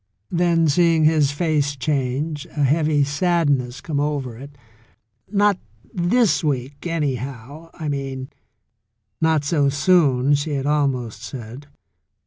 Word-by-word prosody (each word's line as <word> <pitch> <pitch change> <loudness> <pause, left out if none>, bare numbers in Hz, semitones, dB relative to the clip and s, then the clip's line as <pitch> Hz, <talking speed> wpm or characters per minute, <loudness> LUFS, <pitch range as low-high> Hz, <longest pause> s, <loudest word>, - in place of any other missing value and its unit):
Then 170 -2 +2
seeing 165 +1 +3
his 155 -3 +4
face 145 -2 0
change, 140 +2 -2
a 150 - -2
heavy 150 +1 +2
sadness 145 -4 0
come 150 -3 -2
over 145 -5 -2
it, 140 +4 -12 0.7
"Not 205 -2 +2 0.3
this 195 +5 +2
week, 140 +1 -3
anyhow, 140 -1 -4
I 155 - -5
mean" 135 -2 -4 0.9
("Not 160 -2 +2
so 145 -1 +2
soon,'* 145 -3 +3
she 145 +1 0
had 135 -1 -2
almost 130 -7 -1
said). 120 +4 -8
145 Hz, 115 wpm, -21 LUFS, 135-160 Hz, 0.9 s, his